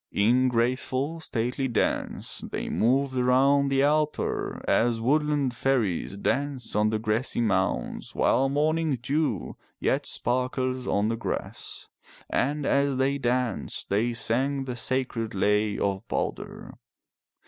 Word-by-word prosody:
In 120 +5 +3
graceful 130 +6 0
stately 125 -2 -2
dance 115 -4 -1
they - - -3
moved 130 +3 +1
around 135 +3 +3
the 135 0 +2
altar 150 +1 0
as 115 -1 +2
woodland 145 +1 +1
fairies 110 -8 0
dance 135 +2 -2
on 105 0 +3
the 110 - 0
grassy 110 +4 0
mounds 100 -5 -1
while 135 +1 +3
morning 155 0 +1
dew 140 - -1 0.2
yet - - 0
sparkles 130 +1 -1
on 105 +2 +1
the 115 - 0
grass. 115 - -5 0.4
And 145 +2 0
as 140 -1 +2
they 135 +2 +1
danced 125 -4 -2
they 115 +4 +1
sang 135 +5 0
the 125 -2 -4
sacred 120 -3 -2
lay 105 +1 +2
of 100 +2 -2
Balder. - - -4
130 Hz, 125 wpm, -26 LUFS, 115-140 Hz, 0.4 s, In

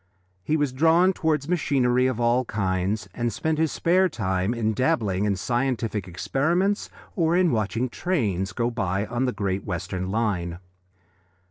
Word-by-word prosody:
He 155 +10 +1
was 145 -4 0
drawn 165 +6 +4
towards 155 -4 0
machinery 130 -7 +2
of 130 -3 -2
all 120 +2 +2
kinds, 95 -1 -1
and 120 +2 -1
spent 155 +7 -1
his 160 -1 +2
spare 185 +2 +2
time 95 - -1
in 110 -2 0
dabbling 105 -5 +1
in 100 -1 +1
scientific 120 -1 -1
experiments 160 - 0 0.3
or 170 -1 +2
in 180 -2 +3
watching 115 +2 0
trains 110 - -1
go 120 +5 -1
by 100 -3 -1
on 120 +3 -1
the 125 - 0
Great 100 -3 -2
Western 90 0 -4
line. 95 -6 -1
120 Hz, 150 wpm, -25 LUFS, 100-150 Hz, 0.3 s, drawn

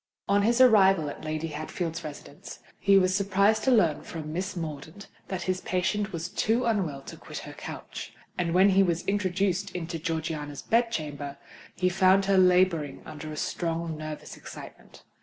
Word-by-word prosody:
On 200 +1 +3
his 235 +4 +2
arrival 195 - +6
at - - -11
Lady 155 +1 -3
Hatfield's 155 +2 -4
residence, 150 -2 -9 0.2
he 200 0 +5
was 185 -1 +3
surprised 200 +2 +2
to 265 - +4
learn 175 - +3
from 155 -2 -7
Miss 190 +4 -3
Mordaunt 160 +3 -7 0.2
that 185 -2 -4
his 185 0 -1
patient 200 +3 -1
was 170 0 -4
too 230 +7 0
unwell 180 -12 -1
to - - -9
quit - - -9
her - - -9
couch; - - -8 0.2
and 170 -1 -1
when 190 +2 +6
he 195 0 +5
was 175 -2 +1
introduced 195 -1 0
into 165 -1 -4
Georgiana's 155 -3 -3
bed 230 +1 +2
chamber, 145 -6 -4 0.4
he 185 - +1
found 190 +2 +4
her 195 -1 +4
labouring 180 -5 +3
under 155 0 -8
a 150 - -7
strong 165 0 -2
nervous 155 0 -7
excitement. - - -12
180 Hz, 170 wpm, -27 LUFS, 155-195 Hz, 0.4 s, arrival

